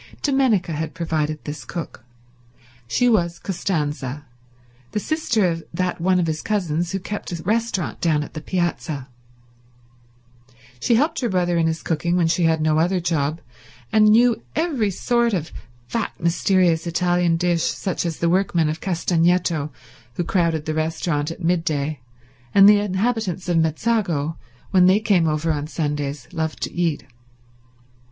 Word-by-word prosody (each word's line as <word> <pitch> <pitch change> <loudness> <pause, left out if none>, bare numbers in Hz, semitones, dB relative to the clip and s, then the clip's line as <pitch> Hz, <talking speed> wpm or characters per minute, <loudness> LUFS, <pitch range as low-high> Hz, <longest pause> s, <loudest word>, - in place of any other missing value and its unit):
Dominica 260 - +2
had 160 +1 -4
provided 155 -3 -2
this 145 -2 -6
cook. 165 -2 -7 0.8
She 245 - +2
was 170 -7 +2
Costanza, 150 -7 -3 0.7
the - - 0
sister 240 - 0
of 165 -1 -2
that 180 -1 -1
one 185 +1 +3
of 175 - +1
his 155 -1 -2
cousins 175 -5 -1
who 195 - -2
kept 205 +1 -6
a 170 -2 -5
restaurant 220 -3 -1
down 155 -3 +2
on - - -9
the 155 - -6
piazza. 160 -6 -2 1.7
She 235 - +2
helped 300 +7 +1
her 240 - 0
brother 175 -2 +1
in 165 -1 +2
his 160 0 -2
cooking 170 +2 0
when 175 - +3
she 165 +1 +2
had 160 -1 +2
no 155 0 +2
other 180 +3 +2
job, 160 -2 -1 0.5
and 215 -1 +5
knew 230 +1 +4
every 290 -10 +1
sort 235 +3 +1
of 160 -4 -4 0.4
fat, 230 - -2
mysterious 170 0 +2
Italian 175 0 +1
dish 175 -1 +1
such 190 +2 -1
as 170 -3 -3
the 170 - 0
workmen 175 -3 +2
of 155 +1 -4
Castagneto, 170 -3 +1 0.5
who 175 - -1
crowded 165 -3 0
the 155 - -2
restaurant 155 -1 -1
at 165 +2 -8
midday, 155 -4 0 0.6
and 195 0 +9
the 205 0 +7
inhabitants 205 -2 -1
of 175 -2 +2
Mezzago 165 -2 0 0.4
when 180 -1 +5
they 190 +3 +5
came 195 -6 +2
over 155 +1 0
on 150 -1 -2
Sundays, 145 -4 -3
loved 160 -5 -2
to - - -4
eat. 170 -4 -1
170 Hz, 155 wpm, -22 LUFS, 160-195 Hz, 1.7 s, and